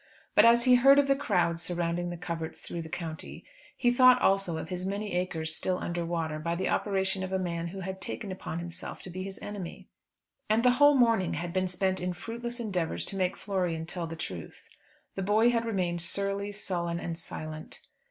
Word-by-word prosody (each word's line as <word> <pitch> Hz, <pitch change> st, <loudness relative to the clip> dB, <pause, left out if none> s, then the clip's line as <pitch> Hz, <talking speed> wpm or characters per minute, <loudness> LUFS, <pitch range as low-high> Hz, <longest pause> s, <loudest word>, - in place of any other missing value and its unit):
But -, -, +7 dB
as 235 Hz, +1 st, +6 dB
he 255 Hz, 0 st, +6 dB
heard 270 Hz, +3 st, +7 dB
of 285 Hz, -1 st, +5 dB
the 275 Hz, -, +4 dB
crowds 175 Hz, -11 st, +1 dB
surrounding 175 Hz, 0 st, -1 dB
the 175 Hz, -, -5 dB
coverts 165 Hz, -1 st, -5 dB
through 170 Hz, -, -5 dB
the 160 Hz, -, -8 dB
county, 165 Hz, -2 st, -6 dB, 0.3 s
he 245 Hz, -2 st, +3 dB
thought 255 Hz, 0 st, +7 dB
also 195 Hz, -6 st, +2 dB
of 160 Hz, 0 st, -6 dB
his 180 Hz, 0 st, -3 dB
many 200 Hz, +2 st, -3 dB
acres 165 Hz, -3 st, -1 dB
still 185 Hz, +2 st, -1 dB
under 175 Hz, -1 st, -2 dB
water, 165 Hz, -2 st, -2 dB
by 170 Hz, +2 st, -1 dB
the 185 Hz, -, -1 dB
operation 190 Hz, -1 st, 0 dB
of 185 Hz, -, -4 dB
a 190 Hz, -, +1 dB
man 170 Hz, -2 st, -2 dB
who 190 Hz, +3 st, -6 dB
had 190 Hz, +1 st, -5 dB
taken 210 Hz, -4 st, -5 dB
upon 185 Hz, -3 st, -5 dB
himself 170 Hz, 0 st, -7 dB
to 185 Hz, -, -8 dB
be 185 Hz, +2 st, -5 dB
his 190 Hz, 0 st, -5 dB
enemy. 200 Hz, -4 st, -7 dB, 0.6 s
And 220 Hz, +2 st, +3 dB
the 250 Hz, -, +7 dB
whole 290 Hz, 0 st, +8 dB
morning 230 Hz, -7 st, +3 dB
had 170 Hz, 0 st, -4 dB
been 185 Hz, 0 st, +1 dB
spent 185 Hz, +1 st, 0 dB
in 180 Hz, 0 st, -2 dB
fruitless 235 Hz, +6 st, -5 dB
endeavours 190 Hz, -8 st, -1 dB
to -, -, -3 dB
make 185 Hz, -2 st, 0 dB
Florian 180 Hz, -5 st, -1 dB
tell 170 Hz, 0 st, -4 dB
the 165 Hz, -, -6 dB
truth. 90 Hz, -, -7 dB, 0.5 s
The 195 Hz, -, -4 dB
boy 215 Hz, +5 st, +4 dB
had 230 Hz, -1 st, 0 dB
remained 180 Hz, -6 st, -1 dB
surly, 200 Hz, +3 st, -2 dB
sullen, 175 Hz, -4 st, -2 dB
and 170 Hz, -1 st, -4 dB
silent. 155 Hz, -2 st, -7 dB
185 Hz, 205 wpm, -29 LUFS, 170-205 Hz, 0.6 s, whole